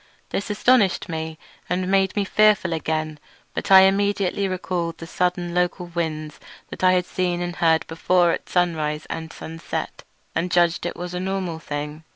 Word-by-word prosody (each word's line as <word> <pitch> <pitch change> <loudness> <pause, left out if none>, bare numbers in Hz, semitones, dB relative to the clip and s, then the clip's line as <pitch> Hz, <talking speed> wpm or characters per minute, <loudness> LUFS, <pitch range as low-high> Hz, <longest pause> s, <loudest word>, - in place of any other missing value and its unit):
This 200 - -2
astonished 210 -3 +3
me 160 -1 -4 0.3
and 180 +1 0
made 195 0 +2
me 205 -2 +1
fearful 210 -4 +3
again, 155 -1 -2 0.3
but - - -4
I 190 -1 +10
immediately 200 0 +2
recalled 180 -3 -3
the 165 - -8
sudden 180 0 -1
local 180 0 0
winds 160 -3 -4 0.4
I 185 0 +5
had 180 -1 +2
seen 180 -2 -1
and 175 0 -4
heard 160 -1 +3
before 175 +1 +2
at - - -4
sunrise 155 -4 0
and 160 0 -5
sunset, 165 0 -6 0.3
and 180 - -1
judged 175 0 +2
it - - -5
was 180 0 -6
a 180 - -2
normal 185 -3 -3
thing. 150 +1 -5
175 Hz, 165 wpm, -23 LUFS, 160-185 Hz, 0.4 s, I